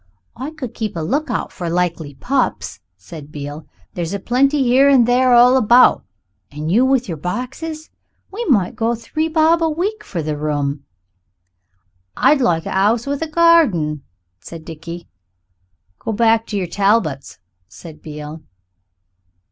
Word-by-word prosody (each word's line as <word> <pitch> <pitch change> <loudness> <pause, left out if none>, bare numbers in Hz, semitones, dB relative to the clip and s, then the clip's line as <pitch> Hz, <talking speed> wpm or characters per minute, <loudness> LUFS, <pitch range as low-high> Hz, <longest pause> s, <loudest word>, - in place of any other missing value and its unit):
"I 265 +4 -5
could 300 -7 -8
keep 215 -4 -4
a 165 - -3
lookout 285 - -2
for 175 -3 -5
likely 170 -4 -2
pups," 130 - -2 0.2
said 145 - -12
Beale; 145 +1 -8 0.3
"there's 175 +2 -4
a - - -4
plenty 275 +6 +1
here 260 +3 +4
and 255 -4 +5
there 250 +1 +3
all 250 +2 +6
about 245 +1 +5 0.5
and 150 +2 -4
you 230 +7 +4
with 260 -2 +1
your 165 -4 -5
boxes. 270 - -6 0.4
We 435 +5 -4
might 205 - +1
go 230 +1 0
to - - -13
three 310 +6 -2
bob 325 +1 +2
a 325 - +2
week 385 +8 -3
for 170 -4 -5
the 155 0 -3
room." 145 -2 -3 1.3
"I'd 295 -2 +3
like 165 -8 +1
a - - -4
'ouse 215 +5 +2
with 280 +1 -3
a 325 - -2
garden," 300 - +3 0.4
said 165 - -11
Dickie. 170 +1 -9 0.9
"Go 225 - -4
back 225 +1 +2
to 210 - -3
yer 190 - -1
Talbots," 180 -6 0 0.3
said 150 - -13
Beale. 150 0 -8
220 Hz, 155 wpm, -18 LUFS, 160-270 Hz, 1.3 s, all